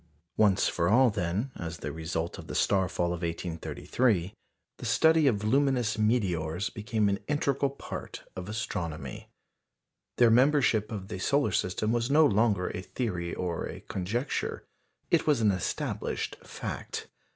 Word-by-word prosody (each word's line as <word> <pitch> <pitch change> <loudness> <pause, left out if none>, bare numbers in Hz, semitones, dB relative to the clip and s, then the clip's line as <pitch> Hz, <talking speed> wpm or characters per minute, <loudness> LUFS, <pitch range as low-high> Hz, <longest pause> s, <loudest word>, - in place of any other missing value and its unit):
Once 100 -3 +4
for 85 0 +1
all, 125 +3 +5
then, 100 +6 -2
as 85 -1 -6
the - - -5
result 80 +1 -3
of - - -9
the - - -6
star 95 -2 +2
fall 85 0 0
of 85 - -5
1833, 90 +4 -1 0.4
the - - -8
study 160 -2 +4
of 105 -5 +1
luminous 125 -2 +2
meteors 95 -5 0
became 110 0 0
an 100 0 +1
integral 140 -1 +1
part 140 - -7
of 95 +1 -6
astronomy. 85 - -4 0.9
Their 120 -2 +6
membership 125 -4 +4
of 100 -3 -5
the 95 - -5
solar 140 +4 +2
system 95 +4 0
was 120 +1 0
no 155 +2 +6
longer 105 -5 +2
a 90 - -5
theory 90 -4 -3
or 85 -2 -2
a - - -8
conjecture 110 +9 -3 0.5
it - - +3
was 150 -5 +4
an 110 -2 +4
established 95 -2 -2
fact. - - -6
105 Hz, 150 wpm, -29 LUFS, 90-125 Hz, 0.9 s, Their